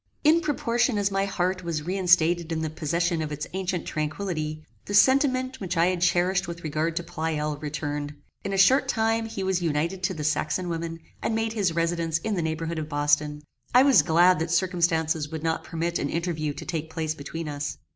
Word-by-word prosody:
In 320 +2 +5
proportion 245 -6 +1
as 200 -1 +1
my 195 0 +1
heart 185 -1 -1
was 165 -3 -3
reinstated 175 -2 +2
in 160 -1 -1
the 155 - -2
possession 170 +2 -1
of 155 -1 -4
its 150 0 -4
ancient 185 -2 -2
tranquillity, 155 -1 -3 0.2
the 205 - -2
sentiment 260 +1 +3
which 185 -2 -3
I 165 - +5
had 180 -2 -2
cherished 180 +1 +2
with 170 0 -7
regard 155 +2 -1
to 175 - -2
Pleyel 160 -3 -2
returned. 145 -1 -4 0.3
In 200 - -3
a 195 - -1
short 195 +9 +5
time 225 0 +1
he 200 -3 -5
was 190 -1 0
united 165 +3 -1
to 185 +1 -1
the 155 - -4
Saxon 155 +3 0
woman, 165 0 -4 0.2
and 225 - -1
made 225 0 -1
his 195 -6 0
residence 165 -1 0
in 215 +6 -3
the 180 - 0
neighbourhood 160 +1 -2
of 155 0 -5
Boston. 150 0 +1 0.3
I 255 - +8
was 275 -2 +6
glad 175 +1 +4
that 165 +1 -2
circumstances 165 -3 +1
would 160 -1 -6
not 160 0 -1
permit 170 +1 -2
an 140 - -1
interview 160 -3 -2
to - - -8
take 160 -2 -3
place 160 -1 -2
between 155 +2 -6
us. 145 0 -4
170 Hz, 200 wpm, -26 LUFS, 155-190 Hz, 0.3 s, I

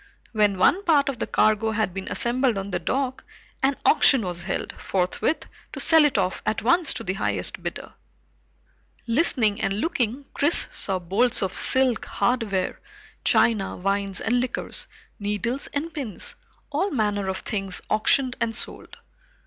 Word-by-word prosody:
When 210 -3 +2
one 350 - +3
part 295 -6 +3
of 265 - -5
the - - -2
cargo 215 +1 +2
had 220 -4 -1
been 190 0 -6
assembled 245 -1 +1
on 195 +1 -4
the 175 - -1
dock, 260 +8 -2 0.4
an 270 0 +2
auction 270 -5 +5
was 175 -1 -4
held 180 - -3
forthwith 185 - -1 0.3
to - - -6
sell 320 -2 +5
it 280 -6 +1
off 185 -1 0
at 215 - -1
once 335 +6 +3
to - - -5
the 185 - -2
highest 195 - -2
bidder. - - -6 1.1
Listening 230 -5 +2
and 195 - 0
looking, 260 -3 -1
Chris 295 +4 +2
saw 195 -2 -2
bolts 200 +7 +1
of 190 -1 -2
silk, 260 +1 +2
hardware, 220 -7 -1 0.4
china, 215 -5 +2
wines 195 0 -1
and 245 +2 +1
liquors, 250 0 -3 0.3
needles 210 +6 -2
and 305 +3 -3
pins 250 - -5 0.4
all 340 +8 0
manner 210 - -1
of 190 - -2
things 195 -4 -3
auctioned 250 +4 +2
and 225 -1 0
sold. - - 0
225 Hz, 155 wpm, -24 LUFS, 195-265 Hz, 1.1 s, auction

